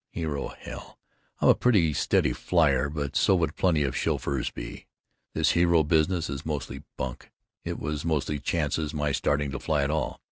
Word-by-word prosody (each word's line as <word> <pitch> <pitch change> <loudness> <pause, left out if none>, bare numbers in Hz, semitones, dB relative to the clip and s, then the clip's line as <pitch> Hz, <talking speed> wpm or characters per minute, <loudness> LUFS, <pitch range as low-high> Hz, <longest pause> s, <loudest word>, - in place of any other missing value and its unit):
Hero, 75 -4 -3
hell! - - -10 0.4
I'm - - +5
a - - +9
pretty 95 -11 +3
steady - - +2
flier 70 -6 +2
but 70 -2 -4
so 95 - +4
would 85 -3 0
plenty 80 -5 +2
of 65 -3 -2
chauffeurs 70 -2 -1
be. - - -8 0.5
This - - +3
hero 85 -2 +4
business 80 +2 +2
is 70 0 -5
mostly 70 -3 -4 0.2
bunk, 65 -4 -5 0.3
it - - -4
was 75 0 -3
mostly 75 -2 -1
chance 75 0 -1 0.2
my 75 -1 0
starting 70 +1 0
to 70 - -4
fly 75 -3 0
at 70 - 0
all. 80 0 -2
75 Hz, 175 wpm, -27 LUFS, 70-80 Hz, 0.5 s, a